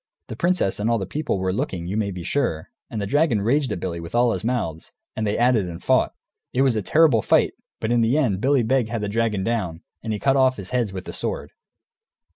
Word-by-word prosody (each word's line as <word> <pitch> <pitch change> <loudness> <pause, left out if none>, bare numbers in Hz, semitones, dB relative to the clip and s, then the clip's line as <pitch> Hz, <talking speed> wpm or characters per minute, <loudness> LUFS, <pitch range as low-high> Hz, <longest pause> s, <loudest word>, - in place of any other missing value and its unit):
The - - -5
princess 175 - +1
and 105 +2 0
all 115 - +3
the 95 - -3
people 145 +1 -2
were 95 0 -1
looking, 90 -3 -3
you 95 +4 -3
may 105 -2 0
be 90 -3 -6
sure, 85 - -1 0.2
and 110 - -4
the 100 - -2
dragon 145 -1 +2
raged 135 +6 +1
at - - -2
Billy 85 -1 -4
with 85 +5 -7
all 120 0 +4
his - - -3
mouths, 110 -10 -2 0.2
and 110 -1 -1
they 105 - 0
at 125 +1 +4
it 100 -5 +1
and 85 -1 -7
fought. - - +2 0.4
It 130 - +3
was 130 -4 +3
a 110 - 0
terrible 150 - +4
fight, - - +3 0.3
but 110 - -2
in 120 -1 +3
the 115 +5 +2
end 110 -11 +1
Billy 135 -1 +3
Beg 125 -1 +1
had 115 -2 -2
the 105 - -2
dragon 110 -2 0
down, 95 -7 -2 0.2
and 110 - -4
he 105 - -1
cut 135 +5 +2
off 130 -1 +3
his 95 -3 -7
heads 120 -5 0
with 95 -1 -6
the - - -7
sword. - - -4
110 Hz, 255 wpm, -23 LUFS, 95-130 Hz, 0.4 s, all